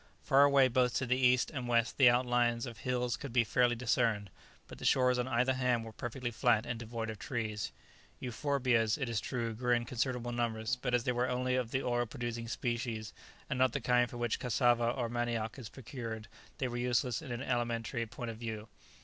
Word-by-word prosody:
Far 140 +1 +6
away 140 -2 +5
both 125 0 +2
to 130 - 0
the 125 +1 +2
east 125 -1 +3
and 130 -4 -4
west 115 -1 +1
the 130 -3 +8
outlines 120 -1 +2
of 115 -4 -8
hills 125 +1 -1
could 140 - -7
be 120 0 +4
faintly 120 +2 +2
discerned, 115 -4 0 0.4
but - - -11
the - - -9
shores 125 -1 +3
on 125 - -1
either 125 +1 +2
hand 125 -3 +1
were 110 - -8
perfectly 120 +2 -4
flat 110 0 +2
and 115 - -4
devoid 115 -1 -4
of 110 - -9
trees. 110 -5 -3 0.5
Euphorbias, 125 -3 +1
it 140 -4 -2
is 115 -2 -1
true, 115 -3 -3
grew 120 +2 +1
in 120 0 -1
considerable 120 0 -2
numbers, 120 0 -1
but 125 0 -1
as 120 - +1
they 125 - +1
were 125 +1 0
only 125 0 0
of 125 -3 -1
the 130 +2 -1
oil 120 -1 0
producing 115 +1 -4
species, 115 -2 -3 0.3
and 125 - -2
not 130 -2 +3
the - - 0
kind 125 0 +2
from 120 - -8
which 120 -1 -1
cassava 120 -1 +2
or 120 -1 -1
manioc 120 0 -2
is 115 -4 -8
procured, 115 -4 -7 0.3
they 130 - -1
were 120 0 -4
useless 125 +2 0
in 145 -6 -8
an 120 +2 -3
alimentary 120 -1 -1
point 120 +1 -6
of 110 - -9
view. 110 -2 -6
120 Hz, 210 wpm, -33 LUFS, 115-125 Hz, 0.5 s, the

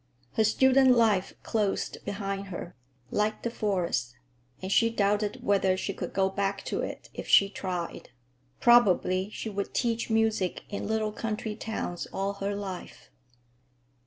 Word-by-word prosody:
Her 220 - +3
student 260 +3 +5
life 210 -5 +2
closed 210 -3 -1
behind 195 -1 -3
her, 175 -1 -7 0.4
like 210 +1 0
the 235 - -1
forest, 180 - -1 0.4
and 190 +1 -5
she 230 +3 +4
doubted 205 -1 0
whether 195 -2 +2
she 195 - -3
could - - -5
go 195 -1 +2
back 195 0 -2
to - - -2
it - - -6
if - - -7
she 200 - +6
tried. 180 -4 -4 0.5
Probably 195 -5 +4
she 215 - -6
would 200 0 -4
teach 230 -2 0
music 220 -4 +1
in 200 - -4
little 220 -1 0
country 215 0 -3
towns 215 -5 -4
all 195 +1 -1
her 200 +1 -1
life. 195 -3 -7
200 Hz, 145 wpm, -28 LUFS, 195-220 Hz, 0.5 s, she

